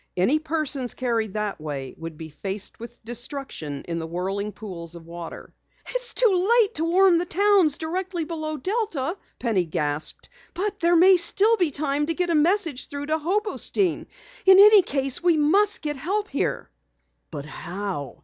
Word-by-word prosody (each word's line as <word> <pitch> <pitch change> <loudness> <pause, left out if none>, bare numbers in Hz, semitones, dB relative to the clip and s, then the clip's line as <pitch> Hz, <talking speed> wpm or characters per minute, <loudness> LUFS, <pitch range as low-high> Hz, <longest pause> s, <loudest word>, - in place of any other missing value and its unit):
Any 245 +13 +2
persons 305 -5 -2
carried 230 -5 -2
that 210 -6 -3
way 140 -4 -5
would 165 -1 -8
be 160 0 -8
faced 195 +6 -6
with 235 0 -11
destruction 240 - -5
in 170 -1 -3
the 160 - -5
whirling 195 +5 -3
pools 175 -6 -8
of 165 -1 -11
water. 170 0 -9 0.4
"It's - - -1
too 390 -5 +3
late 425 -3 +2
to 320 - -1
warn 360 0 +4
the 350 - -2
towns 390 -6 +3
directly 345 +1 -3
below 310 -1 -4
Delta!" 375 - -2 0.2
Penny 210 -7 0
gasped. 150 -1 -3 0.3
"But 405 +2 -3
there 340 -1 +3 0.2
still 425 +6 +4
may 360 - +4
be - - -2
time 290 0 -1
to 330 - -1
get 360 0 0
a - - +2
message 325 -3 +2
through 285 0 -6
to 310 +2 0
Hobostein. 390 +1 0 0.4
In 380 0 +9
any 415 +1 +9
case, 275 -2 -1
we 345 -2 +3
must 390 +8 +3
get 295 -2 -2
help 405 +9 -2
here!" - - -3 0.6
"But 145 -3 -7
how?" 175 -2 -6
295 Hz, 170 wpm, -24 LUFS, -, 0.6 s, In